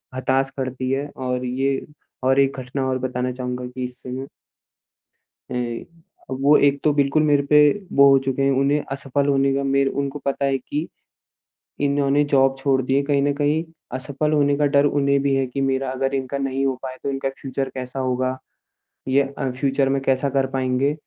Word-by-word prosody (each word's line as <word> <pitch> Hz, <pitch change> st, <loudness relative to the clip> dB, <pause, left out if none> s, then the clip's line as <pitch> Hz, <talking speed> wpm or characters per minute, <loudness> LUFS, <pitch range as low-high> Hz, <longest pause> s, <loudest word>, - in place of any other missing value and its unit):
हताश 135 Hz, +1 st, +1 dB
करती 130 Hz, -1 st, -3 dB
है। 140 Hz, +2 st, -1 dB
और 125 Hz, -1 st, -3 dB
ये 135 Hz, +2 st, 0 dB, 0.4 s
और 130 Hz, +1 st, +3 dB
एक 135 Hz, 0 st, +2 dB
घटना 130 Hz, +1 st, -3 dB
और 130 Hz, -, 0 dB
बताना 125 Hz, 0 st, -2 dB
चाहूँगा 125 Hz, 0 st, -4 dB
कि 125 Hz, +1 st, -6 dB
इस 125 Hz, 0 st, -6 dB
समय 130 Hz, +2 st, -5 dB, 1.2 s
ए 120 Hz, -2 st, -3 dB, 0.5 s
वो 140 Hz, +3 st, +4 dB
एक 140 Hz, -1 st, +3 dB
तो 150 Hz, -, +4 dB
बिल्कुल 145 Hz, +1 st, +2 dB
मेरे 145 Hz, -2 st, +3 dB
पे 150 Hz, +1 st, +5 dB, 0.4 s
वो 140 Hz, 0 st, +8 dB
हो 135 Hz, -, +6 dB
चुके 135 Hz, 0 st, 0 dB
हैं। 135 Hz, -, +3 dB
उन्हें 140 Hz, +2 st, +2 dB
असफल 140 Hz, +1 st, -1 dB
होने 135 Hz, -1 st, +3 dB
का 140 Hz, -, 0 dB
मेरे 135 Hz, 0 st, +2 dB
उनको 140 Hz, +1 st, -3 dB
पता 140 Hz, 0 st, -1 dB
है 135 Hz, -1 st, +1 dB
कि 150 Hz, +5 st, -4 dB, 1.0 s
इन्होंने 140 Hz, +1 st, +2 dB
जॉब 135 Hz, 0 st, +4 dB
छोड़ 135 Hz, -1 st, +1 dB
दी 130 Hz, +1 st, 0 dB
है 140 Hz, -, +4 dB
कहीं 140 Hz, -1 st, +1 dB
न 145 Hz, -, +2 dB
कहीं 145 Hz, +2 st, +1 dB, 0.3 s
असफल 140 Hz, +4 st, -2 dB
होने 145 Hz, -1 st, +3 dB
का 150 Hz, -, +2 dB
डर 140 Hz, 0 st, +5 dB
उन्हें 140 Hz, -1 st, +2 dB
भी 140 Hz, 0 st, +1 dB
है। 135 Hz, 0 st, +1 dB
कि 135 Hz, +2 st, -4 dB
मेरा 135 Hz, 0 st, 0 dB
अगर 135 Hz, +1 st, -1 dB
इनका 135 Hz, +1 st, -2 dB
नहीं 135 Hz, 0 st, -1 dB
हो 135 Hz, -1 st, +1 dB
पाए 130 Hz, -1 st, -6 dB
तो -, -, -1 dB
इनका 135 Hz, 0 st, -2 dB
फ्यूचर 135 Hz, 0 st, -3 dB
कैसा 130 Hz, +1 st, -5 dB
होगा? 130 Hz, 0 st, -1 dB, 0.7 s
ये 135 Hz, +2 st, +4 dB, 0.2 s
अ, 130 Hz, -, -1 dB
फ्यूचर 135 Hz, +1 st, 0 dB
में 135 Hz, 0 st, 0 dB
कैसा 135 Hz, +1 st, +1 dB
कर 135 Hz, 0 st, +1 dB
पाएँगे? 130 Hz, +2 st, +1 dB
135 Hz, 195 wpm, -22 LUFS, 130-140 Hz, 1.2 s, वो